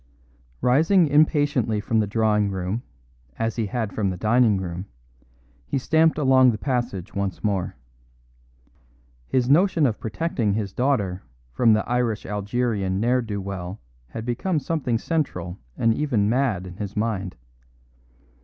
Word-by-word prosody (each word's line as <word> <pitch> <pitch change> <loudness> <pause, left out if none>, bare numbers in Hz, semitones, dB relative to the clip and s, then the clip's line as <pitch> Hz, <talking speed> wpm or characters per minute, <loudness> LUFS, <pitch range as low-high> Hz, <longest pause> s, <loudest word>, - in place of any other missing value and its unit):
Rising 160 +9 +4
impatiently 145 -7 +2
from 110 +2 0
the 105 - +1
drawing 105 -1 +2
room, 95 +4 -3 0.6
as 115 0 -1
he 110 -3 0
had 110 -2 -3
from 100 -3 0
the 90 - -4
dining 110 +1 +3
room, 90 0 -5 0.8
he 75 - -1
stamped 160 +4 +3
along 130 -3 +5
the 110 - 0
passage 120 -7 -3
once 100 -2 -3
more. 100 -4 -1 1.5
His 125 -2 +1
notion 165 +2 +4
of 115 -5 0
protecting 115 -3 -1
his 100 -2 -3
daughter 105 -9 0 0.3
from 115 - +4
the 110 - 0
Irish 120 -3 0
Algerian 105 -1 -1
n'er 125 +3 +2
do 105 -4 -4
well 95 -1 -6 0.3
had 115 +7 -7
become 140 +9 -1
something 145 -6 -1
central 100 - -3 0.2
and 115 -1 +3
even 120 -7 +1
mad 115 -6 0
in 90 -1 -10
his 105 0 -6
mind. 105 -5 -2
110 Hz, 140 wpm, -24 LUFS, 100-130 Hz, 1.5 s, along